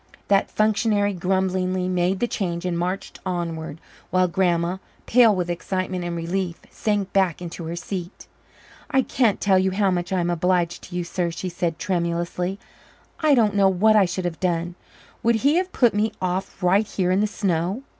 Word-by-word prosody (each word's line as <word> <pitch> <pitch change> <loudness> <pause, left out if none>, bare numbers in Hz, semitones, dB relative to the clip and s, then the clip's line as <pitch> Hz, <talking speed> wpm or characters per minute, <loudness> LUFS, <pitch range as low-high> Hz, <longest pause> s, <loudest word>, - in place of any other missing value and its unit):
That 200 -1 +3
functionary 215 -1 +1
grumblingly 185 0 0
made 180 +1 0
the 240 - +2
change 175 -6 -3
and 180 -1 -1
marched 180 +3 -3
onward, 165 -4 -4 0.3
while 185 0 +3
Grandma, 175 0 +1 0.3
pale 230 -3 +5
with 180 -2 -1
excitement 185 +1 -3
and 175 0 -3
relief, 170 +1 -2
sank 205 -3 -1
back 190 -5 +2
into 170 -1 -7
her 165 +1 -4
seat. 180 +1 -6 0.6
"I 265 0 +3
can't 235 -6 +1
tell 190 -2 +3
you 190 0 +2
how 195 0 +1
much 175 0 -2
I 190 - +1
am 175 0 0
obliged 175 0 0
to 175 - -9
you, 175 - -1
sir," 170 0 -2
she 180 +2 -5
said 170 -2 -2
tremulously. 175 +1 -2 0.6
"I 305 -3 +4
don't 220 -5 +3
know 200 -1 +4
what 210 +4 +4
I 205 -2 +6
should 180 +1 -3
have 170 -2 -3
done. 175 -1 -1 0.5
Would 235 0 +3
he 280 +8 +3
have 370 +1 0
put 240 -9 +3
me 210 +2 0
off 185 +1 -3
right 195 +4 +3
here 185 -3 0
in 185 - +3
the 210 - +2
snow?" 195 +2 -1
185 Hz, 185 wpm, -23 LUFS, 175-200 Hz, 0.6 s, I